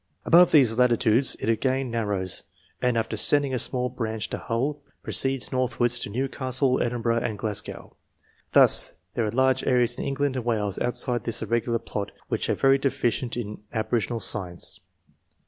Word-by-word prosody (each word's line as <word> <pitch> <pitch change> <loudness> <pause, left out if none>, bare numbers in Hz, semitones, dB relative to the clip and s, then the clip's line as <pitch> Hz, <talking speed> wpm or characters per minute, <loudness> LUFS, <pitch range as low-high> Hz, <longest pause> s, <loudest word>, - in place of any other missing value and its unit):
Above 175 +1 +6
these 125 -6 +4
latitudes 120 0 +3
it - - -4
again 130 +2 0
nar 115 -2 -2
rows, 95 -3 -1 0.4
and 125 -2 +1
after 115 0 -2
sending 140 +5 +3
a 125 - 0
small 125 +1 0
branch 110 -3 -4
to - - -3
Hull, 140 +6 -2 0.2
proceeds 135 -1 0
northwards 120 -2 0
to - - -2
Newcastle, 130 +2 0
Edinburgh, 115 -1 0
and 110 -2 -3
Glasgow. 105 -1 -5 0.6
Thus - - +6 0.2
there 115 - -1
are - - -2
large 130 +2 +2
areas 125 -1 +2
in - - -3
England 140 0 -1
and 130 - -3
Wales 105 -4 -1
outside 120 -1 -1
this 115 - -2
irregular 115 0 0
plot 105 -3 -5 0.2
which - - -2
are - - +2
very 135 0 +3
deficient 125 -3 -1
in 105 -3 -6
aboriginal 115 +1 -1
science. 90 -6 -1
120 Hz, 165 wpm, -25 LUFS, 110-130 Hz, 0.6 s, Above